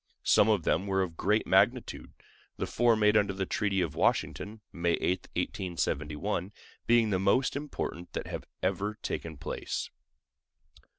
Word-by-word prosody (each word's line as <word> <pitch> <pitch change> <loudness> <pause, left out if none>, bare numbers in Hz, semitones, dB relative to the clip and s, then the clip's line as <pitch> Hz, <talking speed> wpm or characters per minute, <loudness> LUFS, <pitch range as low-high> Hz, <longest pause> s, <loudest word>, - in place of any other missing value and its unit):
Some 105 - +5
of 105 -6 +2
them 90 +7 +1
were 95 -1 +2
of 85 -3 -5
great 105 +6 +1
magnitude, - - +2 0.5
the - - -1
four 120 -1 +3
made 105 -1 +3
under 100 -2 +3
the 95 0 -2
treaty 100 0 0
of 85 -4 -1
Washington 105 +1 0
(May 85 0 +1
8, 90 +2 -1
1871) 85 0 -2 0.4
being 115 -2 +4
the 95 - +2
most 100 +9 +2
important 140 - -5
that - - -3
have - - -6 0.2
ever 100 +3 -1
taken 80 -2 -4
place. - - -4
95 Hz, 145 wpm, -30 LUFS, 90-105 Hz, 0.5 s, Some